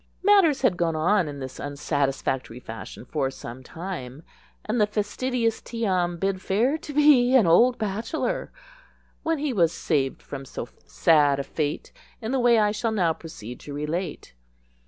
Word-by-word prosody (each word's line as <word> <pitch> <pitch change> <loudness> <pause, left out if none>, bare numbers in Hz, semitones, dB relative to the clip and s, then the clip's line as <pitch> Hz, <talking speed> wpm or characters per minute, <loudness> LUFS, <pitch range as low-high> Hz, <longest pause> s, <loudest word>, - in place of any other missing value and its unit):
Matters 370 -9 +5
had 205 -9 +3
gone 165 -2 0
on 175 +3 +2
in 145 -1 -6
this 130 -1 -7
unsatisfactory 140 -3 -2
fashion 115 0 -9
for 135 -1 -1
some 130 -1 -9
time, 155 -2 -7 0.4
and 220 +1 0
the 210 - +4
fastidious 230 +3 -1
Tee 230 -1 -4
am 175 -3 +1
bid 195 +1 -1
fair 230 +11 +1
to 310 - -8
be 280 -4 +5
an 240 -7 +6
old 235 +10 +5
bachelor, 225 - -2 0.7
when 325 0 0
he 290 -2 -1
was 170 -6 +3
saved 140 -6 -1
from 135 -1 -7
so 135 - -7 0.2
sad 140 - +4
a 140 - -2
fate 145 +1 -3 0.3
in 225 0 -4
the 265 - +1
way 240 -1 +5
I 210 -1 +3
shall 220 +2 -1
now 180 -7 +2
proceed 125 -8 -9
to 145 - -8
relate. 155 - -4
180 Hz, 165 wpm, -25 LUFS, 145-235 Hz, 0.7 s, an